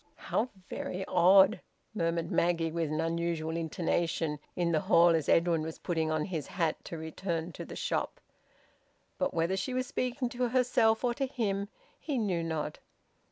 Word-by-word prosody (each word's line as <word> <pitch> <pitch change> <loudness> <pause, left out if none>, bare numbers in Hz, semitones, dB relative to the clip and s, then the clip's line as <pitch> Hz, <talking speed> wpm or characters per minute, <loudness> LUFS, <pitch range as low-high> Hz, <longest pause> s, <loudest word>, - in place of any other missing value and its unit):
"How 250 - -1 0.2
very 190 +1 -4
odd!" 185 +2 +5 0.3
murmured 170 -4 -1
Maggie, 170 -1 +1
with 165 -2 -1
an 155 - -1
unusual 165 -1 -1
intonation, 165 -1 -1 0.2
in 175 -1 +1
the 160 - +3
hall, 170 +3 +5
as 165 -3 +1
Edwin 165 -1 +3
was 160 +1 -5
putting 160 -2 -1
on 155 -1 0
his 165 -7 -4
hat 165 -4 -1
to 165 - -6
return 165 +1 -3
to - - -8
the - - -8
shop. - - -2 1.0
But - - +1
whether 165 +3 0
she 220 +7 -2
was 255 0 0
speaking 250 +1 -2
to 245 +1 -1
herself 245 -3 +3
or 245 -1 +2
to 270 +2 -1
him, 205 -6 -2 0.3
he 290 -4 -2
knew 195 -7 0
not. 160 -2 -3
170 Hz, 165 wpm, -30 LUFS, 165-205 Hz, 1.0 s, odd